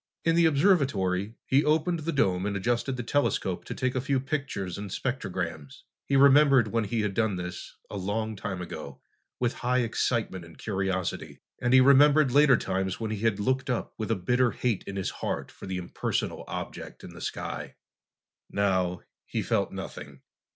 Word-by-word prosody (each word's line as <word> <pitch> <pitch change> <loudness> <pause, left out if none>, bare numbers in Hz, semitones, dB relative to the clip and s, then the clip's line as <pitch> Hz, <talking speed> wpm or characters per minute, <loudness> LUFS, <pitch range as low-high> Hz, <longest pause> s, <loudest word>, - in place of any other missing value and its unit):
In 165 0 +3
the 170 -1 +5
observatory, 130 - +2
he 140 +3 +3
opened 160 +3 +2
the 160 +2 -2
dome 95 - +1
and 100 -1 -1
adjusted 120 +5 -1
the 120 - -3
telescope 95 -9 0
to - - -6
take 130 -1 -1
a 130 - -1
few 135 +1 +1
pictures 135 - -3
and 100 -1 -6
spectrograms. 90 - -4 0.2
He 140 - +1
remembered 135 -3 +6
when 115 0 0
he 110 +2 -1
had 105 -2 -1
done 110 -2 +1
this, 90 0 -6
a 100 - -6
long 110 +3 -2
time 95 -3 -4
ago, 70 -5 -8 0.4
with 120 -1 +1
high 125 +1 +2
excitement 115 -5 -1
and 85 -2 -14
curiosity, 95 -3 -2 0.2
and 120 - +1
he 130 0 +8
remembered 140 +1 +6
later 140 -2 +6
times 95 -2 -2
when 110 -2 -3
he 110 - -3
had 110 -2 +1
looked 130 +5 0
up 125 - -2
with 110 - -3
a 115 - +2
bitter 125 +7 +2
hate 115 -3 -1
in 100 - -5
his 95 -1 -2
heart - - -4
for - - -11
the 95 -1 -3
impersonal 90 -1 -3
object - - -7
in - - -9
the - - -11
sky. - - -5 0.7
Now, 95 -3 0 0.3
he - - -2
felt - - 0
nothing. 70 -2 -8
115 Hz, 180 wpm, -28 LUFS, 95-135 Hz, 0.7 s, he